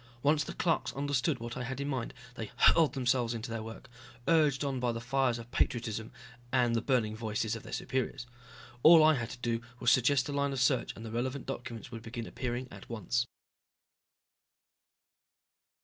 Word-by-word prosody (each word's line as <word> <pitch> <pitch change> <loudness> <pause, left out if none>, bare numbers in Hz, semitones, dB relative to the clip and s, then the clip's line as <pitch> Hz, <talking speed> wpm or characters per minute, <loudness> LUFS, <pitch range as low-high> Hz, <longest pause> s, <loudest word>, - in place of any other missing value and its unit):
Once 150 +1 +4
the - - -6
clerks 165 -2 +1
understood 140 +1 0
what 120 +1 -6
I 125 - -4
had 130 +2 -4
in 140 - -2
mind 130 -3 -3 0.2
they 110 -4 -6
hurled 160 -3 +5
themselves 125 -3 +1
into 115 0 -5
their 115 -1 -3
work, 115 +1 -9 0.4
urged 150 -4 +4
on 135 -2 -1
by 125 -1 +1
the 115 - -4
fires 125 0 +1
of 115 +1 -10
patriotism 115 -3 -1 0.4
and 120 -3 +3
the 115 - +1
burning 115 -4 +1
voices 110 0 -2
of 115 - -7
their - - -11
superiors. 130 0 -2 0.6
All 160 +2 +9
I 155 0 +7
had 120 -5 -2
to - - -7
do 120 -1 -1 0.2
was 120 - +4
suggest 130 +1 +4
a - - -3
line 140 0 0
of 135 - -2
search 125 0 +2
and 110 - -9
the 110 - -6
relevant 130 +3 -2
documents 120 -2 -6
would 115 -2 -7
begin 115 0 -6
appearing 125 +1 -4
at 100 0 -12
once. 120 +2 -1
125 Hz, 185 wpm, -31 LUFS, 115-135 Hz, 0.6 s, All